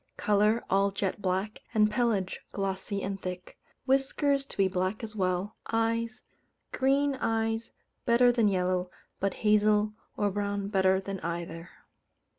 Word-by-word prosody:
Colour, 210 +2 +2
all 195 +1 +3
jet 195 0 -2
black, 190 +3 -1 0.2
and 215 -1 +4
pelage 210 -5 0
glossy 195 0 -2
and 195 0 -3
thick. 180 0 -7 0.3
Whiskers 275 +1 +1
to - - -11
be 195 -1 +4
black 185 +4 -2
as 220 -1 -6
well. 185 +1 -1
Eyes: 230 +1 -1 0.5
green 275 +2 +2
eyes 225 -1 -1 0.3
better 245 +1 +5
than 235 -3 +3
yellow, 185 -1 +1 0.3
but 195 0 0
hazel 210 0 +4 0.2
or 205 -1 +1
brown 200 0 -2
better 190 -1 +3
than 195 0 -5
either. 170 0 -5
205 Hz, 135 wpm, -29 LUFS, 190-225 Hz, 0.5 s, better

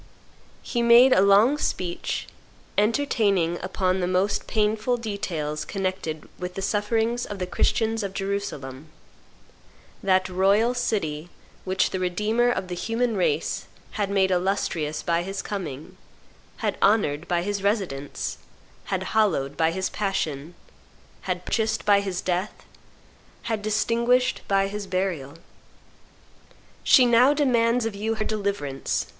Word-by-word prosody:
He 240 - -1
made 235 +2 +7
a - - +5
long 205 +9 +5
speech, 175 -9 -2 0.5
entertaining 205 - +1
upon 185 0 0
the 180 - 0
most 185 +3 0
painful 220 +3 +1
details 170 -9 -3
connected 185 -5 -4
with 180 0 -5
the 195 - -4
sufferings 225 +4 0
of 205 - -6
the 185 - -2
Christians 225 +4 0
of 195 -1 -5
Jerusalem, 160 -9 -4 1.1
"that 185 -1 +2
royal 200 +6 +3
city 175 -10 -2 0.4
which 190 0 +1
the 185 - -2
Redeemer 210 +7 +1
of 185 -6 -1
the 180 - -5
human 225 +6 -1
race 185 - 0 0.2
had 205 -2 -2
made 195 -1 +2
illustrious 175 -5 -1
by 170 0 +1
His 195 +2 -5
coming, 185 -3 -6 0.6
had - - -2
honored 175 -7 +2
by 175 -1 0
His 205 +1 -2
residence, 190 -9 -2 0.5
had - - -2
hallowed 165 -11 +1
by 160 0 +2
His 185 +3 -2
passion, 170 -6 -3 0.7
had 180 0 -2
purchased 220 -1 -1
by 205 -1 +5
His 190 -3 -3
death, 185 +3 -3 0.8
had 225 -3 -2
distinguished 235 +4 +1
by 195 0 +2
His 205 0 -5
burial. 185 -7 -2 1.5
She 255 - +6
now 245 +4 +5
demands 240 -4 +2
of 225 - -2
you 220 +3 -2
her 215 -1 -2
deliverance 200 -11 -2
195 Hz, 130 wpm, -25 LUFS, 180-220 Hz, 1.5 s, made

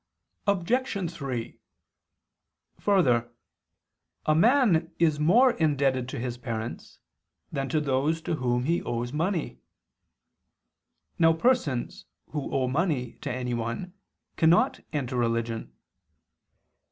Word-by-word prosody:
Obj. 200 -1 0
3: 130 -7 -5 1.2
Further, 125 - +2 0.9
a 155 - +4
man 185 - +4
is 155 -3 +2
more 235 +12 +5
indebted 140 - +1
to - - -5
his 120 0 -4
parents 115 -2 -5 0.5
than 135 -1 -2
to 155 - +1
those 145 +3 0
to 160 - -1
whom 125 -2 0
he 170 +5 +1
owes 120 +2 -3
money. 160 - -1 1.6
Now 165 -1 +6
persons 160 - 0 0.3
who 150 -3 -4
owe 130 -1 +1
money 135 -4 -1
to - - -3
anyone 125 +6 -3 0.4
cannot 165 +2 +4
enter 135 -4 -2
religion. 115 -1 -1
145 Hz, 105 wpm, -27 LUFS, 125-170 Hz, 1.6 s, Now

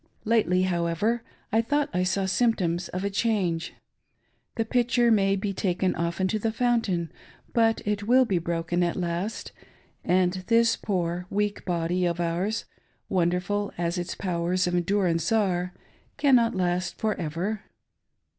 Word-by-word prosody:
Lately, 195 -5 +3
however, 180 +6 0 0.3
I 225 +1 +4
thought 290 +4 0
I 180 - +1
saw 190 +1 0
symptoms 190 -5 +1
of 185 +1 -4
a 200 - -1
change. 195 -6 0 0.8
The 225 - 0
pitcher 240 0 +2
may 195 -2 +3
be 200 0 -2
taken 185 -1 0
often 170 +3 -1
to 215 - 0
the 225 +1 0
fountain, 220 - 0 0.4
but 225 -1 +2
it 205 0 -2
will 255 +2 +5
be 190 -6 +1
broken 170 +1 -1
at 175 -1 +1
last, 180 +5 -3 0.5
and 185 +1 +1
this 230 -1 +4
poor, 180 -2 -2
weak 205 0 -1
body 175 0 0
of 170 0 -2
ours, 175 +6 -1 0.4
wonderful 180 +3 0
as 170 +1 -1
its 175 0 -4
powers 180 0 0
of 175 - -1
endurance 175 -2 +1
are, 185 -5 +1 0.5
cannot 255 -6 +4
last 180 0 -1
for 220 -1 0
ever. 180 +7 -2
185 Hz, 145 wpm, -26 LUFS, 175-220 Hz, 0.8 s, will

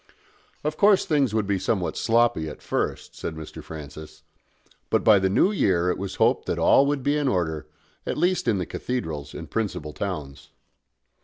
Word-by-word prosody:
Of 150 +1 -2
course 205 -1 +5
things 140 -6 +2
would 110 -2 +1
be 100 -1 0
somewhat 95 -1 -1
sloppy 115 -9 +2
at 75 - -11
first, - - -3
said 80 - -5
Mr. 80 -1 -9
Francis; 75 0 -10 0.7
but - - +2
by 105 -3 +6
the 95 0 +1
New 180 - +3
Year 90 - +2
it - - -3
was 95 -1 -4
hoped - - +2
that - - -1
all 140 - +5
would 145 -2 -1
be 145 +2 +2
in 145 -2 0
order, 80 - -1 0.4
at - - -3
least 180 -5 +1
in 110 -4 +3
the 90 - -2
cathedrals 80 - -4
and - - -7
principal 100 -9 -3
towns. 75 -8 -5
95 Hz, 180 wpm, -25 LUFS, 80-125 Hz, 0.7 s, by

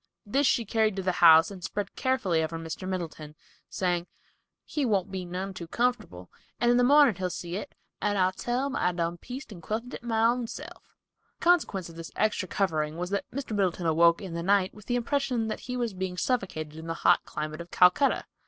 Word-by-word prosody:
This 270 +7 +2
she 235 - +2
carried 215 -1 +1
to 195 - -3
the 185 - +1
house 160 +1 +8
and 185 -3 -10
spread 200 +3 -4
carefully 205 -11 +1
over 160 +1 -3
Mr. 165 +3 -6
Middleton, 160 -4 -5 0.3
saying, 175 -2 -1 0.6
"He 295 - -2
won't 200 -6 +1
be 185 -2 -4
none 185 +2 -4
too 175 -2 -7
comfortable, 215 - -2 0.3
and 240 0 +3
in 245 - +4
the 245 - +4
mornin' 285 -1 +6
he'll 185 -1 -1
see 175 0 -5
it, 205 - -6 0.3
and 205 0 +1
I'll 185 -1 +3
tell 240 +7 -2
him 275 -1 -3
I 180 - +1
done 170 0 -2
pieced 255 +2 -8
and 180 -5 -10
quilted 225 +8 -4
it - - -6
my 225 -2 0
own 240 0 +2
self." - - -10 0.4
The - - -10
consequence 315 - +2
of 165 -1 -12
this 165 -1 -7
extra 210 -3 0
covering 160 -5 -1
was 180 +2 -4
that 200 - -2
Mr. 255 -5 -5
Middleton 185 -3 0
awoke 170 +3 +4
in 185 -3 -6
the 170 - -3
night 190 +1 +2
with 210 -1 -15
the 245 - 0
impression 245 -2 0
that - - -3
he 250 -1 -5
was 235 -4 -1
being 185 -1 -4
suffocated 170 -11 -2
in 160 - -8
the 165 - -2
hot - - +5
climate 155 +2 -5
of 170 - -10
Calcutta! 180 +13 +4
190 Hz, 220 wpm, -28 LUFS, 170-235 Hz, 0.6 s, house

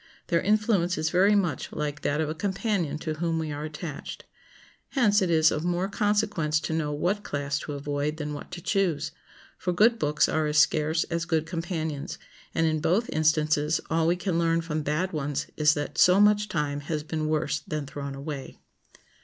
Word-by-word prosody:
Their 170 -1 +3
influence 205 -4 +2
is 155 0 0
very 195 +4 +4
much 180 -6 0
like 150 -1 -3
that 145 +1 0
of 155 - 0
a 155 - -2
companion 190 -3 -1
to 155 0 -3
whom 165 +1 -1
we 160 -1 -2
are 145 +1 -4
attached. 155 -1 -7 0.7
Hence 210 -7 +4
it 185 - +1
is 160 -1 +5
of 155 - -2
more 175 +2 0
consequence 205 -7 +1
to 160 - -3
know 155 -2 -1
what 180 +8 -1
class 145 0 -2
to 150 - -6
avoid 145 +2 -2
than 150 -1 -4
what 145 - -8
to 175 - -7
choose; 165 -7 0 0.5
for 180 - -1
good 225 +6 +4
books 150 0 +2
are 155 -1 0
as 150 0 0
scarce 155 +1 +3
as 170 0 -1
good 160 -2 0
companions, 160 -4 -4 0.4
and 165 - +2
in 155 -1 +1
both 180 +9 +1
instances 155 -1 +2
all 165 0 +2
we 170 - +3
can 180 -2 -1
learn 165 0 +2
from 155 -2 -3
bad 155 +6 -1
ones 145 -1 -2
is 150 0 +4
that 145 -1 -4
so 180 +2 +6
much 210 0 +4
time 145 -4 -1
has 150 +1 -3
been 155 0 -2
worse 150 -1 0
than 150 +1 -4
thrown 140 0 -6
away. 140 0 -6
160 Hz, 195 wpm, -27 LUFS, 150-180 Hz, 0.7 s, so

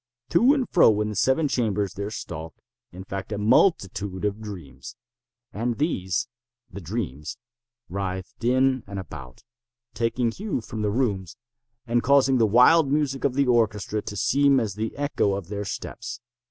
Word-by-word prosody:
To 245 - +5
and 265 -4 -1
fro 110 - +5
in 105 - -1
the 105 - -5
seven 130 +9 +2
chambers 105 -7 0
there 100 +1 -4
stalked, 80 -6 -7 0.3
in 90 +2 -9
fact, 95 +1 -6
a 105 - -2
multitude 100 - +2
of 105 +1 -2
dreams. 80 - -9 0.6
And 115 +2 -2
these—the 120 - -4
dreams—writhed 100 - -6
in 130 +1 +2
and 100 0 -6
about, 65 - -9 0.5
taking 115 +1 0
hue 200 - -3
from 110 -1 -6
the 105 - +1
rooms, 100 -5 -1 0.5
and 120 0 +1
causing 135 -1 +4
the 110 - +4
wild 135 +7 +5
music 145 -2 0
of 135 -3 +1
the 140 0 +3
orchestra 110 -3 +1
to 105 - -7
seem 140 +4 +3
as 110 -5 -2
the 110 +2 -4
echo 140 -8 0
of 95 -3 -6
their 105 0 -4
steps. 120 +4 -6
115 Hz, 155 wpm, -25 LUFS, 100-130 Hz, 0.6 s, To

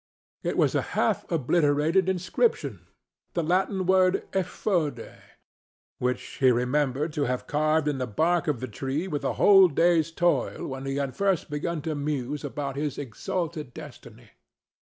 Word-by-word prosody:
It - - -2
was - - +3
a - - +2 0.2
half - - +1
obliterated 160 +3 +2
inscription—the 185 - -2
Latin 185 +3 0
word 185 0 +3
"Effode"—which 160 - -4 0.2
he 130 - +5
remembered 135 +4 0
to 145 -1 0
have 125 0 -2
carved 155 +1 +1
in 145 -3 -1
the 125 - -2
bark 165 +10 +1
of 145 -6 -1
the 130 - -3
tree 135 - -3
with 150 -5 -3
a - - 0
whole 195 -2 +7
day's 165 +1 +2
toil 175 +1 0
when 135 0 -6
he 135 - -2
had 140 -3 -2
first 195 -6 0
begun 155 +2 -3
to 160 -1 -2
muse 145 -1 -3
about 140 -2 -4
his 145 -1 -2
exalted 150 - -4
destiny. - - -12
150 Hz, 145 wpm, -26 LUFS, 135-175 Hz, 0.2 s, whole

